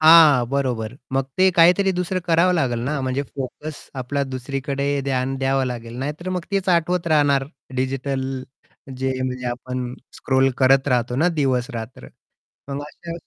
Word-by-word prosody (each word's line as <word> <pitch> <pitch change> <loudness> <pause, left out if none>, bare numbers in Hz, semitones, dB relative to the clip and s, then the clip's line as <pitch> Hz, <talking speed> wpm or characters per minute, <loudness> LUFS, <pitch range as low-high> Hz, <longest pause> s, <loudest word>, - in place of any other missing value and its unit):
हां, 155 -5 +8
बरोबर 125 -4 -1 0.2
मग 135 0 +1
ते 190 0 +6
काहीतरी 180 +3 +5
दुसरं 180 +1 -1
करावं 170 +2 +4
लागेल 130 -8 +1
ना 145 +2 -1
म्हणजे 130 +1 -1
फोकस 140 +3 -7
आपला 135 +2 -2
दुसरीकडे 140 +2 -2
ध्यान 135 0 -1
द्यावं 135 0 +1
लागेल. 120 -1 -6
नाहीतर 150 +7 -4
मग 180 -2 -2
तेच 195 -2 0
आठवत 175 0 +2
राहणार 145 -3 +3 0.3
डिजिटल 130 0 -2 0.5
जे 130 +1 -1
म्हणजे 125 -1 -3
आपण 125 0 -4 0.2
स्क्रोल 130 0 +2
करत 135 +1 +4
राहतो 125 -1 +1
ना 170 +5 +3
दिवस-रात्र 125 -4 -2 0.6
मग 140 +1 -3
अशा 170 +3 -9
135 Hz, 145 wpm, -22 LUFS, 130-155 Hz, 0.6 s, हां